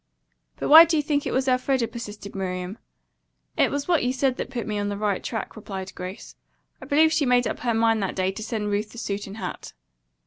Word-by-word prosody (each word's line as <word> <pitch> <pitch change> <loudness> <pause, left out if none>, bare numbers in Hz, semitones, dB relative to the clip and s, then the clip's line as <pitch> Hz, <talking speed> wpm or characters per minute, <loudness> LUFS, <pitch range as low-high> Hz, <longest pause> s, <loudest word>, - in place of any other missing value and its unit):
"But - - -3
why 320 +3 +11
do 330 -1 +1
you 300 - +1
think 290 -1 0
it - - -2
was 265 +1 0
Elfreda?" 255 -1 +1
persisted 210 -4 -8
Miriam. 185 +1 -4 0.8
"It - - +3
was 285 0 -3
what 345 -3 +2
you 245 - +1
said 260 0 0
that - - -4
put 245 -3 -4
me 210 -1 -2
on 205 0 -1
the 200 - -3
right 205 -2 -1
track," 225 - -4
replied 195 -3 -7
Grace. 185 +4 -8 0.5
"I - - -9
believe 315 +2 +4
she 310 - +2
made 245 0 +4
up - - -3
her 235 -2 0
mind 225 -1 +2
that 195 - -2
day 185 0 0
to 195 - -8
send 215 -2 -3
Ruth 210 +1 -1
the - - -12
suit 205 -3 -4
and 200 +2 -9
hat." - - -6
225 Hz, 235 wpm, -25 LUFS, 205-260 Hz, 0.8 s, why